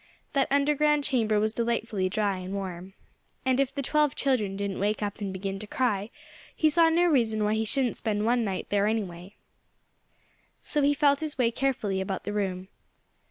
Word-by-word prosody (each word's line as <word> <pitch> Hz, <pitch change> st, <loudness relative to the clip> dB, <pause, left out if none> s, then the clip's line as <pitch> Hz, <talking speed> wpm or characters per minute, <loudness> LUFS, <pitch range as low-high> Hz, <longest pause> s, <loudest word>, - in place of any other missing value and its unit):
That 275 Hz, -2 st, +2 dB
underground 295 Hz, +1 st, +2 dB
chamber 225 Hz, -6 st, +1 dB
was 215 Hz, +1 st, 0 dB
delightfully 230 Hz, -5 st, -1 dB
dry 200 Hz, -1 st, 0 dB
and 185 Hz, +2 st, -5 dB
warm. 190 Hz, -1 st, -6 dB, 0.5 s
And 260 Hz, 0 st, +2 dB
if 275 Hz, -1 st, +1 dB
the 280 Hz, 0 st, -4 dB
twelve 300 Hz, +1 st, +2 dB
children 225 Hz, -8 st, 0 dB
didn't 200 Hz, -1 st, -3 dB
wake 210 Hz, +2 st, 0 dB
up 205 Hz, +1 st, -4 dB
and 200 Hz, -2 st, -2 dB
begin 195 Hz, +1 st, -4 dB
to 215 Hz, -, -7 dB
cry 210 Hz, -4 st, 0 dB, 0.5 s
he 310 Hz, -1 st, +3 dB
saw 330 Hz, +1 st, +5 dB
no 340 Hz, +2 st, +3 dB
reason 230 Hz, -9 st, +2 dB
why 210 Hz, +1 st, +1 dB
he 220 Hz, 0 st, 0 dB
shouldn't 255 Hz, +1 st, 0 dB
spend 210 Hz, -1 st, -1 dB
one 240 Hz, +1 st, +2 dB
night 195 Hz, -3 st, -3 dB
there, 205 Hz, 0 st, +2 dB
anyway. 195 Hz, -3 st, -3 dB, 1.2 s
So 295 Hz, -, -1 dB
he 285 Hz, +1 st, +3 dB
felt 285 Hz, -1 st, +3 dB
his 310 Hz, -2 st, -4 dB
way 240 Hz, -3 st, +2 dB
carefully 230 Hz, -7 st, -1 dB
about 190 Hz, 0 st, -3 dB
the 205 Hz, -, -4 dB
room. 190 Hz, -2 st, -2 dB
220 Hz, 185 wpm, -27 LUFS, 200-275 Hz, 1.2 s, saw